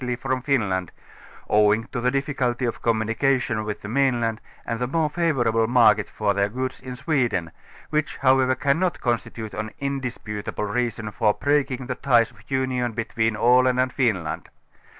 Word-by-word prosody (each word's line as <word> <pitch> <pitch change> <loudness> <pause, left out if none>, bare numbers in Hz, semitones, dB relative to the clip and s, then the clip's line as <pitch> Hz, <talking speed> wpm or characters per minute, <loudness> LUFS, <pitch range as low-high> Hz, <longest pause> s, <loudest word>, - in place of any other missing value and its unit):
\' - - -1
from 130 0 -1
Finland, 100 - 0 0.6
owing 105 +1 +4
to 125 -4 -3
the 125 - +2
difficulty 130 -2 -1
of 120 - -3
communication 115 +1 +1
with 105 -1 -5
the - - -5
mainland 120 -2 +1 0.2
and 115 - -3
the 125 - -1
more 155 +2 0
favour 155 -8 +1
able 115 0 +2
market 120 -4 +4
for 105 -2 0
their 100 0 +1
goods 130 +3 -4
in 125 -1 -7
Sweden, 125 - 0 0.4
which 155 0 -1
however 130 -1 +3
can 140 +4 +1
not 185 -2 0
constitute 115 -2 -3
an 105 +1 -4
indisputable 125 -7 -4
reason 110 0 -2
for 105 0 +1
breaking 135 -3 0
the 125 - -2
ties 120 -3 +2
of - - -21
union 130 -3 -1
between 115 -1 -1
Aland 125 +3 +4
and 130 0 +1
Finland. 95 - -1
125 Hz, 165 wpm, -24 LUFS, 110-130 Hz, 0.6 s, owing